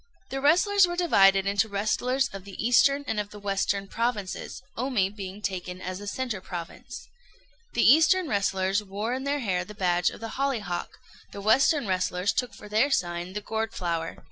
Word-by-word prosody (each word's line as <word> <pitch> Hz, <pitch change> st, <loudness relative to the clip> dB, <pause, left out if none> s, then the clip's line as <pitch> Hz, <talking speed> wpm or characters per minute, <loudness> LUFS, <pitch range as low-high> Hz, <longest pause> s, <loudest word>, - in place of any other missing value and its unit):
The 270 Hz, 0 st, -3 dB
wrestlers 365 Hz, +6 st, +4 dB
were 350 Hz, -, -3 dB
divided 195 Hz, -, +4 dB
into 200 Hz, +2 st, +1 dB
wrestlers 245 Hz, +6 st, 0 dB
of 195 Hz, -1 st, -9 dB
the 195 Hz, -1 st, -11 dB
eastern 275 Hz, +5 st, +3 dB
and 220 Hz, -, -1 dB
of 205 Hz, -1 st, -3 dB
the 210 Hz, -, -11 dB
western 200 Hz, 0 st, -1 dB
provinces, 225 Hz, -4 st, -3 dB
Omi 230 Hz, -6 st, 0 dB
being 200 Hz, 0 st, -8 dB
taken 180 Hz, -2 st, -4 dB
as 185 Hz, +1 st, -5 dB
the 205 Hz, -, -8 dB
centre 235 Hz, -3 st, -3 dB
province. 175 Hz, -2 st, -8 dB, 0.7 s
The -, -, +2 dB
eastern 320 Hz, +6 st, +5 dB
wrestlers 195 Hz, -2 st, 0 dB
wore 205 Hz, +4 st, -3 dB
in 265 Hz, +1 st, -3 dB
their 285 Hz, 0 st, 0 dB
hair 185 Hz, -6 st, 0 dB
the 210 Hz, +3 st, -11 dB
badge 175 Hz, -2 st, +2 dB
of -, -, -11 dB
the 225 Hz, +1 st, -6 dB
hollyhock; 225 Hz, -11 st, -2 dB, 0.3 s
the -, -, -8 dB
western 260 Hz, +7 st, +3 dB
wrestlers 185 Hz, 0 st, 0 dB
took 250 Hz, -4 st, -2 dB
for 210 Hz, -, -11 dB
their 220 Hz, +7 st, +2 dB
sign 175 Hz, -6 st, -1 dB
the 210 Hz, -, -4 dB
gourd 220 Hz, +1 st, -3 dB
flower. 170 Hz, -2 st, -3 dB
205 Hz, 180 wpm, -27 LUFS, 190-255 Hz, 0.7 s, eastern